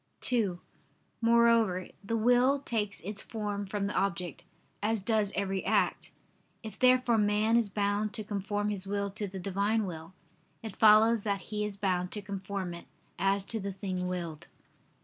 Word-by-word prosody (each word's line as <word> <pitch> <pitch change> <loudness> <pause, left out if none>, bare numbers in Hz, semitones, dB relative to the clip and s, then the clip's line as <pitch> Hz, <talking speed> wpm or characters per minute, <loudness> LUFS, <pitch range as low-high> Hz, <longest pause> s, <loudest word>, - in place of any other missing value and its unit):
(2) 210 -8 0 0.6
Moreover, 230 -5 +4 0.2
the 230 +3 -1
will 245 +4 +4
takes 210 -6 -3
its 200 +3 -3
form 205 -2 -4
from 200 +1 -2
the 205 - -2
object, 180 -3 -2 0.4
as 220 +2 +1
does 210 0 0
every 195 -1 -1
act. - - +1 0.5
If 220 - -8
therefore 255 -2 +4
man 210 +2 +2
is 235 -3 +2
bound 205 +1 0
to 220 - -3
conform 205 0 -2
his 200 -2 -2
will 200 0 -2
to 205 +1 -4
the 190 0 -8
Divine 200 +4 0
will, 165 -1 -7 0.5
it 220 -3 -6
follows 220 +1 +6
that 200 -2 -1
he 210 0 0
is 205 -1 -5
bound 185 -2 0
to 210 - -2
conform 195 -2 -4
it, 170 - -9 0.3
as 195 0 +2
to 225 - -1
the 200 -1 -4
thing 185 -1 -3
willed. 170 -4 -5
205 Hz, 165 wpm, -30 LUFS, 195-220 Hz, 0.6 s, follows